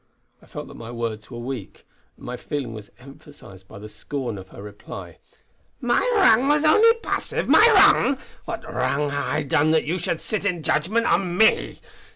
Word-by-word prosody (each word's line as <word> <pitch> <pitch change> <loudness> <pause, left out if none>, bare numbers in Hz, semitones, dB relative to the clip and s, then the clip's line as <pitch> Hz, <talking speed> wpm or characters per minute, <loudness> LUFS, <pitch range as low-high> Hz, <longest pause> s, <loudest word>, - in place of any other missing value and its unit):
I - - -20
felt - - -8
that - - -12
my 115 - -10
words 115 -3 -5
were 120 - -9
weak, 120 -3 -7 0.3
and - - -14
my 125 - -5
feeling 130 -2 -5
was 105 -2 -10
emphasised 130 -8 -15
by - - -12
the 105 +1 -10
scorn 115 +1 -6
of 95 - -12
her 100 - -12
reply: 105 0 -10 0.6
"My - - +1
wrang 270 - +5
was 295 +1 +2
only 440 +9 +5
passive! - - -3
My 440 - +7
wrang! 385 -9 +5 0.3
What - - -6
wrang 130 +4 -1
hae - - -4
I 145 +2 -2
done 150 +2 +1
that 160 0 +2
you 175 +5 -2
should 165 -1 -2
sit 215 - -3
in 180 -5 -2
judgment 200 +12 0
on 175 -1 0
me. 220 +2 +3
145 Hz, 190 wpm, -23 LUFS, -, 0.6 s, My